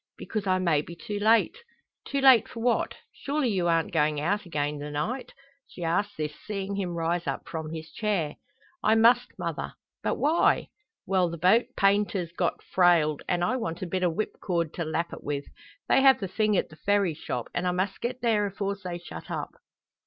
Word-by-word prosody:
"Because 210 -3 -4
I 185 0 +3
may 170 -5 +2
be 170 +3 -10
too 205 +4 -5
late." 225 - +3 0.5
"Too 280 0 -1
late 265 -4 +7
for 230 - -8
what? 235 +1 +1 0.2
Surely 285 -2 -1
you 185 -5 +1
arn't 165 -1 +1
goin' 150 0 +2
out 200 +6 -1
again 145 -2 -2
the 145 +1 -5
night?" 185 - -3 0.4
She 175 - -9
asks 200 +5 0
this, 150 -1 -3
seeing 200 -1 -4
him 185 -3 -2
rise 170 +1 -1
up - - -3
from 160 -2 -5
his 160 0 -7
chair. 190 -8 -1 0.4
"I 220 - +4
must, 235 +2 +4
mother." - - -4 0.3
"But - - 0
why?" 315 +4 +2 0.4
"Well, 185 -2 +2
the 170 - -6
boat's 225 +9 +3
painter's 195 -3 +2
got 170 - -1
frailed, 170 -5 +3
and 175 -1 +1
I 250 +8 +1
want 170 -7 -4
a - - -1
bit 185 +1 -2
o' 180 - +4
whipcord 170 -2 -2
to 170 - -3
lap 165 +2 -2
it - - -9
with. 140 -1 -3 0.4
They - - +4
have 270 -1 +6
the 195 - -3
thing 215 +1 +1
at - - 0
the 155 - -15
Ferry 200 -3 +2
shop, 125 -5 -5
and 180 +1 -1
I - - +2
must 185 +2 -2
get 250 +1 -3
there 215 -4 +2
afores 200 +1 -3
they 180 -2 -4
shut 175 - -10
up." - - -4
185 Hz, 200 wpm, -27 LUFS, 165-210 Hz, 0.5 s, late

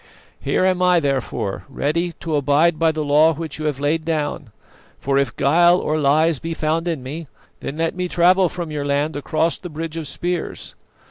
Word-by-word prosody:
Here 185 - 0
am 185 -1 +1
I, 180 -1 +4
therefore, 135 -9 -2
ready 165 +6 -1
to 160 -2 -2
abide 150 +3 +2
by 165 -1 +3
the 155 -1 -3
law 150 +3 +4
which 160 -1 -6
you 155 - -4
have 145 -3 -1
laid 155 +3 0
down; 150 -5 -2 0.5
for 135 0 +1
if 135 -5 -1
guile 170 +6 +4
or 155 -3 -1
lies 155 +1 +3
be 165 0 -4
found 160 +2 -1
in 160 -7 -2
me, 150 +5 -6 0.3
then 145 - -6
let 165 0 0
me 180 0 -3
travel 180 +1 +4
from 170 -2 -6
your 150 -1 -3
land 145 +2 0
across 155 +3 -1
the 180 - -8
bridge 160 +1 -6
of 160 -3 -4
spears. 175 +4 -4
155 Hz, 195 wpm, -21 LUFS, 145-170 Hz, 0.5 s, I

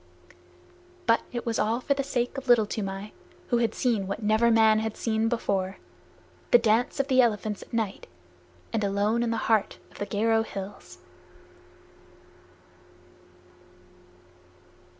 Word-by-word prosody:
But 230 - +3
it 240 -1 -5
was 230 -1 -1
all 220 +3 +1
for 280 - +1
the 275 0 -2
sake 245 -2 -2
of 270 -1 -7
Little 240 -3 +5
Toomai, 200 -1 -5 0.4
who 240 - +2
had 230 -2 0
seen 225 -6 0
what 200 +3 -4
never 220 +3 +3
man 220 -1 +5
had 220 0 -3
seen 225 0 0
before 195 -5 -1 0.7
the - - +8
dance 230 +2 +1
of 275 - +1
the 260 -2 +5
elephants 215 -3 0
at - - -13
night 220 -4 -3 0.7
and 220 -2 0
alone 205 +3 +1
in 235 - 0
the 230 - -1
heart 220 -3 +1
of - - -15
the 205 - -3
Garo 225 +2 +1
hills! 200 -2 -8
225 Hz, 140 wpm, -27 LUFS, 210-235 Hz, 0.7 s, the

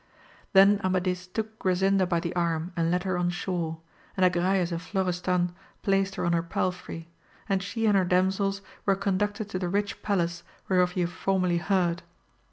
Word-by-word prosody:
Then 200 +1 +6
Amadis 185 -1 0
took 220 +3 -5
Grasinda 190 +1 +2
by 170 -2 +2
the 170 +1 -4
arm, 170 0 -1
and 165 -1 +1
led 180 +1 +1
her 185 -2 -1
on 175 0 +1
shore, 175 -2 -2 0.4
and 185 - +4
Agrayes 180 0 +2
and 170 0 -3
Florestan 180 -1 0 0.3
placed 195 0 +1
her - - -2
on 170 - +2
her 170 - +2
palfrey, 170 -1 -3 0.4
and 195 -2 +1
she 205 +3 -2
and 210 -2 +4
her 190 - +4
damsels 190 +2 +1 0.2
were 195 - +4
conducted 205 +2 -1
to 185 - -3
the 180 -2 -2
rich 205 +2 -1
palace 175 -4 0 0.3
whereof 180 -1 +2
you 180 -2 +1
have 175 - -6
formerly 185 -3 +1
heard. 175 -1 +1
185 Hz, 175 wpm, -27 LUFS, 175-195 Hz, 0.4 s, Then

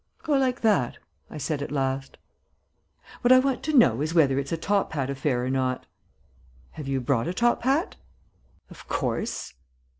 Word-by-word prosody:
"Go 305 - 0
like 260 -2 +1
that," 205 - +2 0.3
I - - -8
said 150 0 -2
at 145 - -5
last. 135 -1 -2 1.0
"What 245 - +3
I 255 - +9
want 260 -1 +1
to 310 -2 +2
know 130 - +5
is 155 +3 -2
whether 140 -5 +4
it's 140 0 -5
a 165 - 0
top 200 +3 0
hat 140 -3 -2
affair 135 -3 -1
or - - -2
not?" 130 -1 -1 0.9
"Have 150 -3 -8
you 135 -1 0
brought 125 +1 0
a 175 - -3
top 240 +3 +2
hat?" 275 - 0 0.7
"Of - - -13
course." 225 - -3
150 Hz, 175 wpm, -26 LUFS, -, 1.0 s, I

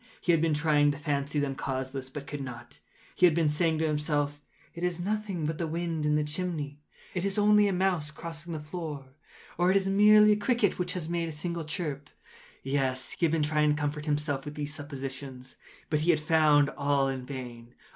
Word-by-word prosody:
He 175 - +1
had 165 -2 +3
been 165 -2 +2
trying 150 -1 +3
to 145 - -1
fancy 145 0 -2
them 140 -1 -1
causeless, 130 0 -4
but 140 +1 -7
could 145 0 -6
not. 120 -2 -9 0.3
He 180 - +5
had 160 - +2
been 165 -2 +2
saying 160 +2 +1
to 160 - 0
himself—“It 150 +2 -3
is 180 -1 -1
nothing 200 -3 -2
but 155 +1 -2
the 170 - -1
wind 165 -1 -2
in 150 - +3
the 150 - +2
chimney—it 150 +1 -5
is 200 +1 -1
only 210 0 +5
a - - +1
mouse 180 -5 0
crossing 165 +2 -7
the 155 - -3
floor,” 150 -3 -6 0.5
or 175 +1 +4
“It 190 - +5
is 195 - 0
merely 210 +2 +6
a - - +5
cricket 210 -2 +1
which 180 - -1
has 175 -4 -4
made 170 -1 -1
a - - -5
single 170 +1 -4
chirp.” 150 -3 -4 0.5
Yes, 135 -1 0
he 170 - 0
had - - -2
been 160 -2 +1
trying 150 0 +2
to 150 +1 +1
comfort 150 +1 -3
himself 145 -2 -1
with 150 0 -7
these 145 -1 -4
suppositions: 135 -3 -7 0.4
but 150 -1 +2
he 165 - 0
had 160 -3 +5
found 150 -2 +4
all 140 -1 +1
in 135 -1 -3
vain. 125 -3 -8
150 Hz, 205 wpm, -29 LUFS, 145-170 Hz, 0.5 s, merely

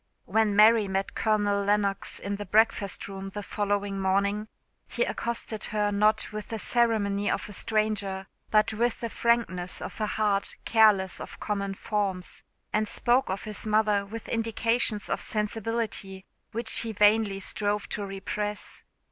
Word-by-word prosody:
When 215 +1 +2
Mary 215 0 +6
met 195 0 -2
Colonel 205 -2 +1
Lennox 200 -1 0
in 200 0 -4
the 205 - -5
breakfast 210 -1 +2
room 195 0 -6
the 205 +1 -6
following 205 -1 -1
morning, 200 +2 +1 0.4
he - - 0
accosted 235 - -3
her 210 -1 0
not 215 +2 +2
with 215 0 -6
the 225 - -4
ceremony 210 -3 +1
of - - -1
a 210 - -8
stranger 205 -2 -1 0.2
but 215 +1 +3
with 235 +2 0
the 230 -1 -3
frankness 230 -7 0
of - - -6
a 215 - +1
heart 205 -2 0
careless 210 -4 +4
of - - -8
common 200 -2 -2
forms, 195 -4 -2 0.3
and 215 0 +1
spoke 250 +5 +2
of 190 +1 -3
his 215 0 -5
mother 210 -1 +3
with 220 +3 -8
indications 225 -1 0
of - - -1
sensibility 210 -3 -3 0.3
which 230 +2 +1
he 225 -1 -3
vainly 210 -1 +3
strove 205 +1 -1
to 210 - -3
repress. 205 +1 -4
210 Hz, 150 wpm, -27 LUFS, 200-220 Hz, 0.4 s, Mary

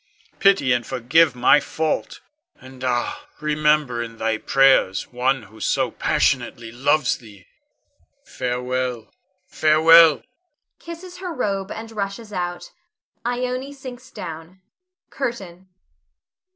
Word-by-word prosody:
Pity 190 -11 +4
and 120 0 0
forgive 130 +6 +2
my 125 +4 +5
fault; 160 0 -3 0.4
and 130 0 -13
ah, 120 -1 -2
remember 150 -4 +1
in 115 -1 -7
thy 110 -1 -1
prayers 135 -8 +3
one 130 0 0
who 110 +2 -16
so - - 0
passionately 115 -1 0
loves 140 +3 +1
thee. 105 -5 -16 0.8
Farewell! 125 -1 -3 0.3
farewell! 160 +1 +5 0.6
[Kisses 340 +2 -10
her 365 -1 -5
robe 200 - -2
and 225 0 -7
rushes 210 +1 -5
out. 175 -1 -4 0.6
Ione 250 +3 -3
sinks 255 -2 -10
down. 165 +1 -9 0.5
CURTAIN. 190 -9 -5
155 Hz, 105 wpm, -22 LUFS, 125-200 Hz, 0.8 s, my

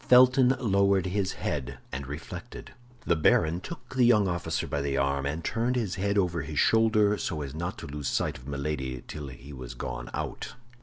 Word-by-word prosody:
Felton 130 +1 +7
lowered 100 -4 +3
his 95 +1 0
head 65 -5 -3
and 65 +1 -5
reflected. 85 - -8 0.3
The 85 - +3
baron 80 +1 +3
took 170 - -9
the 130 -1 +3
young 110 -4 +5
officer 85 -3 -1
by 70 - -2
the 70 -1 -1
arm, 70 0 +1
and 75 +4 -3
turned 115 +3 0
his 110 -7 -1
head 100 +2 0
over 90 -4 +1
his 75 +1 -6
shoulder, 110 -1 +4
so 75 -4 -2
as 70 -1 -6
not 85 +6 -4
to - - -7
lose 70 -1 -5
sight - - -1
of 60 - -13
Milady 70 -3 -3
till 75 -2 -6
he 65 +2 -10
was 65 -2 -8
gone - - -5
out. - - -5
85 Hz, 195 wpm, -28 LUFS, 70-105 Hz, 0.3 s, Felton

